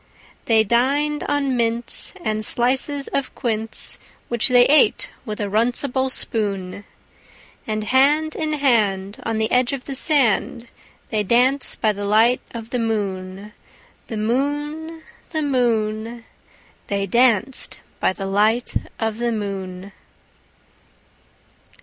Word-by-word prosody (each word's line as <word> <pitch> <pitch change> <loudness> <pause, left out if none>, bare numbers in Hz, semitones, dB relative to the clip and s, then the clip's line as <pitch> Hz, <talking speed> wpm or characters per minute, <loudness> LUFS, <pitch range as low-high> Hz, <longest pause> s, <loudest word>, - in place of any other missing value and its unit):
They 225 -1 +4
dined 280 +7 +1
on 280 -2 0
mince 235 +7 +2
and 215 0 -1
slices 265 +5 +2
of 275 -2 -3
quince, 225 -3 -2 0.3
Which 235 -2 +2
they 245 -1 +6
ate 300 +4 +3 0.2
with 215 0 -5
a - - -1
runcible 245 +5 +1
spoon; 200 -5 -1 0.8
And 215 -1 -2
hand 290 +7 +2
in 310 -1 -2
hand, 215 -7 +1
on 225 -2 -3
the 220 0 -1
edge 250 +1 +2
of 265 -2 -5
the 275 - -5
sand, 255 -4 +1 0.4
They 215 -2 0
danced 250 +6 +1
by 215 - +3
the 205 0 -5
light 225 +4 +3
of 230 0 -9
the 250 - -1
moon, 200 -2 -4 0.5
The 225 - -5
moon, 295 +8 -2 0.3
The 315 -2 -2
moon, 230 -3 -1 0.6
They 200 -1 -1
danced 240 +3 +1 0.2
by - - +2
the 195 +1 -6
light 215 +5 +1 0.3
of 225 0 -2
the 240 0 0
moon. 195 -3 -5
235 Hz, 125 wpm, -21 LUFS, 215-265 Hz, 0.8 s, they